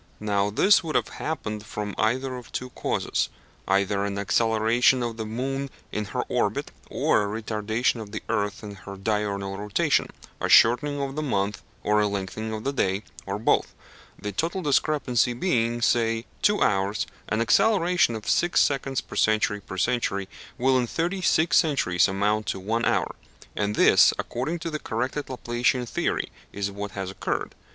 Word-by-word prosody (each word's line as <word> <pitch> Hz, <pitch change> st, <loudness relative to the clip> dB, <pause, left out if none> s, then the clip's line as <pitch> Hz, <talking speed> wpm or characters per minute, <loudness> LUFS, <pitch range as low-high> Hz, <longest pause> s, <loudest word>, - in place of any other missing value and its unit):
Now 100 Hz, -1 st, 0 dB
this 190 Hz, -, +4 dB
would 160 Hz, -2 st, -4 dB
have -, -, +1 dB
happened 105 Hz, -9 st, -3 dB
from 105 Hz, -1 st, -5 dB
either 130 Hz, +4 st, 0 dB
of 125 Hz, -1 st, -10 dB
two 125 Hz, 0 st, -5 dB
causes, -, -, -1 dB, 0.4 s
either 100 Hz, +1 st, +2 dB
an 100 Hz, 0 st, -2 dB
acceleration 115 Hz, +5 st, +3 dB
of 115 Hz, -1 st, -3 dB
the 110 Hz, -1 st, -4 dB
moon 135 Hz, +5 st, -3 dB, 0.2 s
in 105 Hz, -, -2 dB
her -, -, -2 dB
orbit, -, -, -1 dB, 0.2 s
or -, -, +2 dB, 0.2 s
a -, -, -5 dB
retardation 110 Hz, +2 st, 0 dB
of 105 Hz, -2 st, -9 dB
the 110 Hz, -, -5 dB
earth 100 Hz, +1 st, -1 dB
in 105 Hz, -1 st, -7 dB
her 100 Hz, 0 st, -10 dB
diurnal 100 Hz, -1 st, -2 dB
rotation 105 Hz, -1 st, +1 dB, 0.3 s
a -, -, -2 dB
shortening 145 Hz, +5 st, +5 dB
of 135 Hz, -1 st, -3 dB
the 155 Hz, -, -2 dB
month 105 Hz, -7 st, -1 dB, 0.2 s
or 105 Hz, 0 st, +3 dB
a 105 Hz, -, +2 dB
lengthening 100 Hz, +2 st, -4 dB
of 110 Hz, 0 st, -4 dB
the 140 Hz, -, -1 dB
day, 95 Hz, -4 st, 0 dB, 0.2 s
or 100 Hz, +1 st, -2 dB
both. 110 Hz, -, +1 dB, 0.4 s
The 105 Hz, -, -4 dB
total 170 Hz, -, -2 dB
discrepancy 140 Hz, -4 st, +2 dB
being, 120 Hz, -5 st, 0 dB
say, 115 Hz, 0 st, +2 dB, 0.2 s
two 210 Hz, 0 st, +3 dB
hours, 100 Hz, +1 st, +1 dB, 0.2 s
an 110 Hz, -, 0 dB
acceleration 175 Hz, -, +3 dB
of 110 Hz, -, -7 dB
six 175 Hz, 0 st, +3 dB
seconds 135 Hz, -1 st, +1 dB
per -, -, -11 dB
century 110 Hz, -1 st, +2 dB
per 95 Hz, -, -8 dB
century 100 Hz, -3 st, 0 dB, 0.3 s
will 130 Hz, 0 st, +3 dB
in 120 Hz, -, 0 dB
thirty 175 Hz, -, -2 dB
six 160 Hz, -3 st, +3 dB
centuries 140 Hz, -, +3 dB
amount 105 Hz, +2 st, 0 dB
to -, -, -2 dB
one 115 Hz, +5 st, -1 dB
hour; -, -, +1 dB, 0.4 s
and 105 Hz, 0 st, -1 dB
this, -, -, +6 dB
according 135 Hz, +8 st, -3 dB
to 165 Hz, -, -4 dB
the 155 Hz, -, -3 dB
corrected 130 Hz, +5 st, -3 dB
Laplacian 125 Hz, 0 st, 0 dB
theory, -, -, -1 dB, 0.2 s
is 100 Hz, 0 st, -3 dB
what 100 Hz, 0 st, -6 dB
has 95 Hz, -1 st, -3 dB
occurred. -, -, -3 dB
110 Hz, 170 wpm, -25 LUFS, 100-130 Hz, 0.4 s, this